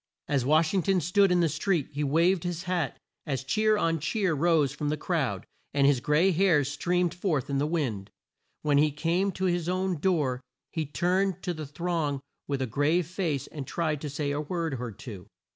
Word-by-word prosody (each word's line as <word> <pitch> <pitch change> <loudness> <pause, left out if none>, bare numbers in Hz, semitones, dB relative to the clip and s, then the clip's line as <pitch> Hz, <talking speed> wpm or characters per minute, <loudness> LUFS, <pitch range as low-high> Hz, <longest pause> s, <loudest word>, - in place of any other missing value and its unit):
As 140 -4 +1
Wash 155 +5 +3
ing 190 - +3
ton 190 +1 +2
stood 185 +4 +3
in 180 -1 +4
the 170 - +3
street 160 0 0
he 145 +1 -2
waved 165 +5 +2
his 175 -1 -3
hat 175 -6 -1 0.3
as 135 -2 -2
cheer 215 +10 +2
on 165 -3 +1
cheer 190 +3 0
rose 155 -2 +3
from 150 - -3
the 150 - -1
crowd, 135 - -1 0.3
and 140 -1 +4
his 140 -2 +4
gray 150 +9 +3
hairs 165 -6 +3
streamed 175 +1 0
forth 160 -8 -1
in 140 - +1
the 145 - +1
wind. 125 - -2 0.5
When 145 -2 +3
he 150 +1 +4
came 170 +6 0
to 190 - -2
his 175 -2 0
own 185 -2 -1
door 145 -8 +1 0.3
he 160 -3 -2
turned 185 +4 0
to 180 - -1
the 155 -3 -6
throng 155 -2 -2 0.3
with 140 -2 -1
a - - 0
grave 145 +8 +1
face 165 -5 -2
and 140 -4 -7
tried 155 -4 -1
to 150 - -4
say 145 0 -2
a 145 +1 -1
word 165 -2 -2
or 120 -2 -4
two. 100 -3 -10
160 Hz, 205 wpm, -28 LUFS, 145-180 Hz, 0.5 s, in